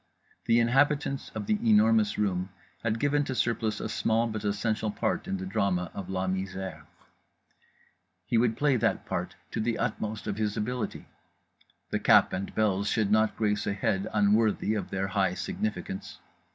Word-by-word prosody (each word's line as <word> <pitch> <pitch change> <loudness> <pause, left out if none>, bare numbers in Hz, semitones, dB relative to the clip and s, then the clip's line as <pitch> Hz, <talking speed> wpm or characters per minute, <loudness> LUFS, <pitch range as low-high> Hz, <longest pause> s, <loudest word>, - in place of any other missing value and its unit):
The 115 0 +4
inhabitants 135 +3 +2
of - - -3
The 210 0 +1
Enormous 220 -1 +4
Room 95 -3 0 0.3
had 115 -1 0
given 145 +2 +2
to 130 - -3
Surplice 115 -3 0
a - - -3
small 115 +1 +1
but 110 -2 -4
essential 105 +1 0
part - - -2
in 95 - -1
the 95 - -5
drama 90 -2 0
of 95 -2 -6
La 95 0 -1
Misère: 95 0 -4 1.4
he 120 - -1
would 115 -1 +2
play 145 -2 +3
that - - 0
part - - -3 0.2
to - - -3
the 115 +1 0
utmost 110 -2 -3
of 100 - -3
his 105 -1 -1
ability; 125 +3 -3 0.9
the - - 0
cap - - +5
and 95 +1 -4
bells 100 -2 +1
should 105 -3 +1
not 110 0 +3
grace 105 -1 0
a - - +1
head 100 0 -1
unworthy 105 +1 +2
of 105 - -3
their 95 0 -2
high 95 -3 +1
significance. 195 - -4
110 Hz, 165 wpm, -28 LUFS, 100-120 Hz, 1.4 s, cap